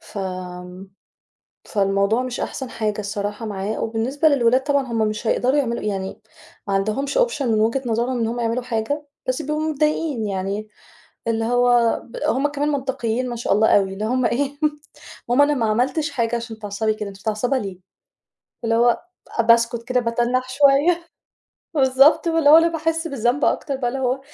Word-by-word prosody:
ف 205 - -10 1.5
فالموضوع 200 +3 +1
مش 255 -1 -5
أحسن 265 -2 -4
حاجة 215 -2 -2
الصراحة 205 +1 -4
معايا 205 0 -3
وبالنسبة 235 +7 0
للولاد 255 -3 +3
طبعًا 280 -1 +1
هم 220 -2 +1
مش 215 +2 -4
هيقدروا 255 +5 +2
يعملوا 235 -5 -1
يعني 195 0 -4 0.5
ما 200 - -1
عندهمش 215 - -1
option 480 -12 +1
من 220 -3 +2
وجهة 230 +5 +1
نظرهم 240 +2 0
إن 225 - 0
هم 235 +2 -3
يعملوا 235 +1 -1
حاجة، 250 +5 -2 0.2
بس 255 0 0
بيبقوا 300 +2 -2
متضايقين 300 -5 0
يعني 200 +2 -3 0.6
اللي 225 0 0
هو 245 -1 +3
ب 235 - -11
هم 270 +4 +2
كمان 290 0 -2
منطقيين 255 -3 -2
ما 240 - -4
شاء 235 - 0
الله 215 +2 +4
أوي 195 -1 0
اللي 210 +2 -4
هم 255 +2 0
إيه، 280 +4 -1 0.7
"ماما 255 +4 +5
أنا 295 - +2
ما 245 -5 0
عملتش 260 +8 0
حاجة 235 -1 -1
عشان 230 -1 -6
تتعصّبي 215 +1 -1
كده، 210 -1 -5
أنتِ 195 0 -12
متعصّبة 220 +5 -1
ليه؟" 195 -6 -5 0.9
اللي 225 0 +1
هو 235 +1 +3 0.4
باسكت 235 0 +3
كده 250 +1 +1
باتنّح 240 +2 0
شوية، 285 +6 +3 0.7
بالضبط 275 +4 +4
واللي 325 -3 +4
هو 315 - +10
أنا 335 +1 +4
باحس 325 0 -1
بالذنب 250 0 0
أكتر 280 -3 0
بقى 255 -2 -1
اللي 265 +2 -3
هو 255 +1 0
240 Hz, 170 wpm, -21 LUFS, 220-275 Hz, 1.5 s, هو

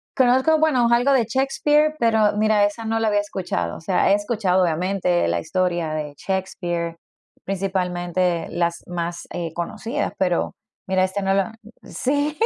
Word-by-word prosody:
Conozco, 260 +5 +4
bueno, 260 -7 +3
algo 245 +4 +4
de 260 -4 +3
Shakespeare, 295 +5 +2
pero 220 -3 +3
mira, 215 -1 +3
esa 205 +3 -4
no 225 0 0
la 225 -1 +2
había 205 -1 +2
escuchado, 180 - -3
o - - -10
sea, 180 +4 +2
he - - +6
escuchado, 205 -3 +1
obviamente, 180 +1 +1
la - - 0
historia 175 -1 -1
de 150 -2 -4
Shakespeare, 175 -3 -3 0.5
principalmente 180 -2 -1
las 170 0 -1
más, 170 -1 -4
eh, 170 -2 -3
conocidas, 225 - -3
pero 180 -3 0 0.3
mira, 190 0 +2
esta 185 +2 -1
no 195 0 +1
la 195 +2 0 0.3
he - - -14
Sí, 290 +3 -1
195 Hz, 160 wpm, -22 LUFS, 175-230 Hz, 0.5 s, he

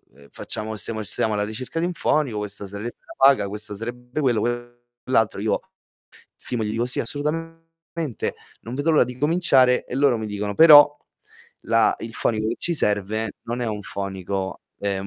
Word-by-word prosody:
ehm, 70 0 -18
facciamo 110 +1 -5
stiamo 110 +2 -2
stiamo 110 +1 -1
alla 105 0 0
ricerca 120 +9 -5
di 170 - +1
un 180 - -2
fonico, 145 -10 0
questa 105 0 -4
sarebbe 100 +4 -6
la - - -12
paga, 135 -6 +5
questo 105 +1 -4
sarebbe 125 +5 -6
quello, 120 -6 +2 0.6
quell'altro". 115 -6 +1
Io, 110 - +1 0.8
firmo 120 -3 -3
gli 105 - -2
dico: 115 +2 0
"Sì, 125 - -2
assolutamente, 165 +1 -4 0.3
non 115 - -7
vedo 145 +5 +1
l'ora 150 - +5
di 125 0 -8
cominciare". 140 -5 +3
E - - -6
loro 135 -4 +3
mi 110 - -4
dicono: 105 0 -3
"Però 145 +1 +9 0.7
la 115 0 +4
il 115 - -6
fonico 110 -1 0
che 115 - -2
ci 170 - -1
serve 105 -2 0
non 120 +1 -3
è - - -1
un 105 -1 -3
fonico, 95 -1 -4 0.2
ehm, 100 -1 -2
115 Hz, 175 wpm, -23 LUFS, 105-140 Hz, 0.8 s, Però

